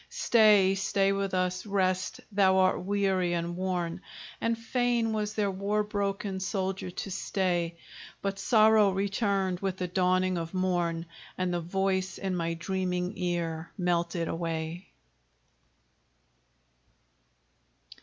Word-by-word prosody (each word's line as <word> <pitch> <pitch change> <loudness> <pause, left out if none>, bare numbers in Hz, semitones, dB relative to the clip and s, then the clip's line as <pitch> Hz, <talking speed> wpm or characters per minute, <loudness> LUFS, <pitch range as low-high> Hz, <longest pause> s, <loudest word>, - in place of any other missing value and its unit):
"Stay, 215 - +5
stay 195 0 +1
with 195 -1 -1
us, 185 0 0
rest; 185 -3 0
thou 190 -2 +4
art 185 -1 +3
weary 190 -2 +1
and 170 0 -2
worn!" 180 -2 -2 0.4
And 230 0 +1
fain 235 -1 0
was 210 -1 -2
their 205 -2 +1
war 200 +2 0
broken 200 -2 -2
soldier 190 -1 -2
to 190 +2 -6
stay: 175 -3 -1 0.4
But 195 0 -3
sorrow 215 -1 +5
returned 195 -1 0
with 190 -1 -2
the 180 - -2
dawning 185 0 +1
of 165 +2 -6
morn, 175 -3 0 0.3
And 185 -1 -1
the 175 - -1
voice 190 +2 -1
in 190 -1 -2
my 165 -1 -1
dreaming 180 +1 -2
ear 170 -2 -2
melted 170 -2 0
away. 165 +2 -3
185 Hz, 120 wpm, -29 LUFS, 180-200 Hz, 0.4 s, Stay